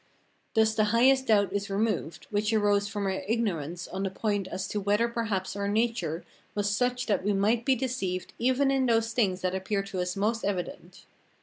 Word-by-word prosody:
Thus 220 -1 +4
the 215 -1 +2
highest 260 +5 +4
doubt 205 -3 +3
is 200 0 -2
removed, 200 -5 -1
which 210 +1 +1
arose 205 -2 +2
from 205 -1 -3
our 190 -1 -1
ignorance 180 -7 -1
on 190 - -5
the 195 - 0
point 205 0 -1
as 190 +1 -4
to 210 - -2
whether 205 +4 +2
perhaps 220 -6 -2
our 200 0 -2
nature 205 -7 0 0.3
was 205 0 0
such 250 +2 0
that 205 -4 0
we 205 +1 +1
might 215 +4 +2
be 265 - +4
deceived 225 -8 -3
even 260 +3 +2
in 265 -1 +2
those 225 -1 +2
things 190 -6 +1
that 185 0 0
appear 195 +1 -1
to 195 -1 -5
us 180 0 -2
the - - -5
most 225 +3 0
evident. 200 +7 -4
205 Hz, 200 wpm, -28 LUFS, 195-230 Hz, 0.3 s, Thus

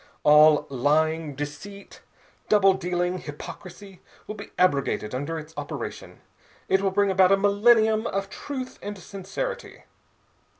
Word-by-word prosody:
All 150 0 +6
lying, 150 +3 0
deceit, 195 +8 -8 0.5
double 195 -2 +5
dealing, 180 -1 -2
hypocrisy, 185 +5 -10 0.2
will - - -6
be 205 -1 -10
abrogated 140 -10 +1
under 145 +6 -3
its 155 0 -9
operation. 145 0 -7 0.5
It 190 0 +2
will 195 - +1
bring 200 +1 +1
about 190 0 +4
a 195 - +5
millennium 220 +2 +3
of 195 0 -3
truth 260 -3 -7
and 205 0 -6
sincerity. 200 - -6
190 Hz, 125 wpm, -25 LUFS, 155-205 Hz, 0.5 s, All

